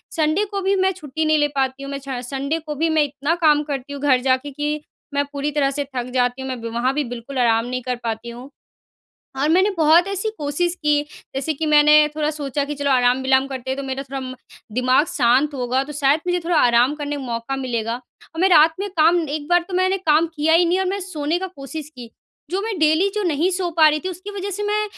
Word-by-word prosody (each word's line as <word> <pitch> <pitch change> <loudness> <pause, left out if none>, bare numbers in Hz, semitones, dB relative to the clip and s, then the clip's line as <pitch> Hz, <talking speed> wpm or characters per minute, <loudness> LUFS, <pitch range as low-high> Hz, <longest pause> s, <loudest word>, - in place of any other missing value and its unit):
Sunday 320 +5 +1
को 395 -1 -2
भी 390 +1 +1
मैं 380 0 +2
छुट्टी 315 -3 -4
नहीं 310 0 +3
ले 295 -1 +3
पाती 270 0 -1
हूँ 275 - -6
मैं 280 - -3
छ 265 -2 -5
सन्डे 280 +5 -2
को 305 -1 -6
भी 325 +3 0
मैं 315 -1 +3
इतना 285 +2 -2
काम 300 -1 +5
करती 285 -1 -5
हूँ 280 - -7
घर 265 -3 +3
जाके 260 +3 +1
कि 295 +2 -3 0.3
मैं 285 0 +1
पूरी 290 +1 -2
तरह 280 -2 +1
से 285 +1 -3
थक 250 0 -3
जाती 245 0 0
हूँ 265 - -5
मैं 255 -2 -4
बीमा 230 0 -4
वहाँ 255 +2 +1
भी 295 +1 0
बिल्कुल 250 +4 -8
आराम 230 -1 +3
नहीं 255 +1 -3
कर 250 0 -2
पाती 225 +1 -4
हूँ। 245 +3 -10 0.9
और 295 - +2
मैंने 375 +5 +4
बहुत 325 +4 +5
ऐसी 395 +2 -2
कोशिश 305 +4 -1
की 295 -1 +3 0.3
जैसे 280 +4 -1
कि 315 +3 -3
मैंने 300 0 +5 0.2
थोड़ा 300 -1 0
सोचा 285 -2 -3
कि 295 0 -5
चलो 280 0 -1
आराम-विलाम 265 +1 +3
करते 260 -1 -6
हैं 265 - -3
तो 275 - -4
मेरा 265 0 -4
थोड़ा 260 -1 -5 0.4
दिमाग 255 +4 +3
शांत 260 +3 +2
होगा 255 0 -1
तो 295 - -9
शायद 285 +2 +3
मुझे 355 0 +1
थोड़ा 335 -1 0
आराम 245 +2 +4
करने 290 -1 -4
का 280 - -5
मौका 235 +1 -4
मिलेगा। 235 -3 -2
और 255 +6 -10
मैं 380 - +4
रात 320 -2 +6
में 405 0 -3
काम 335 +2 +4
एक 295 0 -4
बार 350 +1 +4
तो - - -7
मैंने 375 +1 +2
काम 325 -2 +2
किया 310 +1 +2
ही 340 +1 +5
नहीं 355 +2 +1
और 380 - 0
मैं 400 - -2
सोने 315 0 -2
का 380 - -3
कोशिश 290 +2 -7
की। 240 -2 -10 0.4
जो 385 - -1
मैं 425 -3 -3
डेली 315 +5 +3
जो 420 - -1
नहीं 335 0 +1
सो 360 -1 -1
पा 315 - +7
रही 305 - 0
थी 375 - -1
उसकी 370 +3 -8
वजह 395 +1 -3
से 415 +3 -3
मैं 420 +1 0
290 Hz, 245 wpm, -21 LUFS, 265-330 Hz, 0.9 s, पा